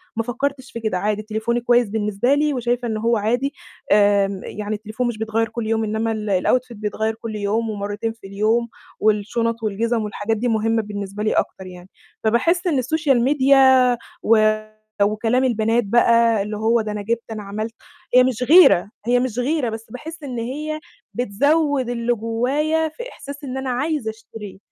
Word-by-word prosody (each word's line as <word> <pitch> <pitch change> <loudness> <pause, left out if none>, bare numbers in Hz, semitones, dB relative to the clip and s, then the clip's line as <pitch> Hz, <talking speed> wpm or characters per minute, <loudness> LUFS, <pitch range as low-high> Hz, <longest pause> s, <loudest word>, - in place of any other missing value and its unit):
ما 225 - 0
فكّرتش 260 +2 -3
في 230 - -6
كده، 220 -5 -1
عادي 210 +2 -1
تليفوني 220 +2 -2
كويس 240 -2 +3
بالنسبة 210 +4 0
لي، 295 0 +2
وشايفة 245 0 -1
إنه 220 -1 -2
هو 230 +1 +2
عادي 245 +7 0 0.4
آآ 200 -2 +3
يعني 210 +1 -4
التليفون 215 +4 -3
مش 240 -2 -3
بيتغيّر 220 0 -1
كُلّ 225 -1 -4
يوم 225 0 +1
إنّما 220 +1 -1
ال 210 -4 -1
الoutfit 255 -1 +1
بيتغيّر 220 +1 -2
كُلّ 225 -1 -7
يوم 210 +2 -1
ومرتين 205 +2 -3
في 225 -3 -13
اليوم 220 +4 0 0.3
والشُنَط 225 +2 0
والجِزَم 225 +2 0
والحاجات 210 +1 -2
دي 245 - -1
مهمة 225 0 +1
بالنسبة 205 0 -5
لي 215 - +1
أكتر 190 -1 -2
يعني، 180 0 -12 0.3
فباحس 335 - +2
إن 305 - +2
السوشيال 270 -2 +1
ميديا 265 -2 +5 0.3
و 225 0 +5 0.7
وكلام 225 +5 +1
البنات 230 -1 +1
بقى 230 0 +4
اللي 210 +1 -5
هو 225 +2 +2
ده 215 - -4
أنا 210 0 -4
جِبت، 230 +3 -2
أنا 215 -1 -5
عَمَلت، 215 +3 -5 0.4
هي 250 - +8
مش 250 -1 0
غيرة، 295 - +6 0.2
هي 245 +1 +3
مش 250 -2 -2
غيرة، 270 0 0
بس 220 0 -6
باحس 315 +6 -9
إن 250 -4 -4
هي 300 +6 -4 0.3
بتزوِّد 275 +5 +1
اللي 240 0 0
جوايا 270 +8 0
في 480 +10 -8
إحساس 280 +1 -10
إن 265 -1 -5
أنا 265 0 -3
عايزة 260 -1 -1
أشتريه، 220 -3 -11
230 Hz, 175 wpm, -21 LUFS, 215-255 Hz, 0.7 s, هي